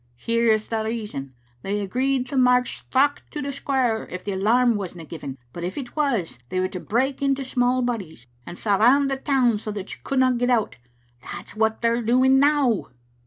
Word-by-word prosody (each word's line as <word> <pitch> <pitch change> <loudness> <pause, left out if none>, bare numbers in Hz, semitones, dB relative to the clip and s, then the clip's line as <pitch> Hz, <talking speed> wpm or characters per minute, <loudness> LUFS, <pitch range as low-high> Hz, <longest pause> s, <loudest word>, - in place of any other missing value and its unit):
Here's 225 - +1
the 225 -1 -1
reason. 210 - -5 0.3
They 205 +6 -2
agreed 255 +6 0
to 275 - -4
march 250 -1 +3
straucht 280 +2 +2
to 300 - -6
the 280 -1 -3
square 255 -5 0
if 180 0 -7
the 205 - -3
alarm 230 +5 +3
wasna 180 -5 -6
given, 140 -4 -7 0.2
but 170 - -6
if 180 +2 -4
it 260 -4 -6
was 240 - -1
they 185 - -1
were 185 - +1
to 185 - -6
break 260 +9 -1
into 275 -1 0
small 250 0 +1
bodies 190 - -4 0.2
and 175 +5 -9
surround 245 +7 +3
the 270 - -1
town 255 -5 +2
so 215 - -6
that 200 -1 -6
you - - -12
couldna 260 -2 +2
get 245 +1 0
out. 235 -4 +1 0.4
That's 175 +10 -8
what 220 +1 0
they're 235 +1 +2
doing 255 +3 +4
now." 280 -7 +2
235 Hz, 190 wpm, -23 LUFS, 200-260 Hz, 0.4 s, doing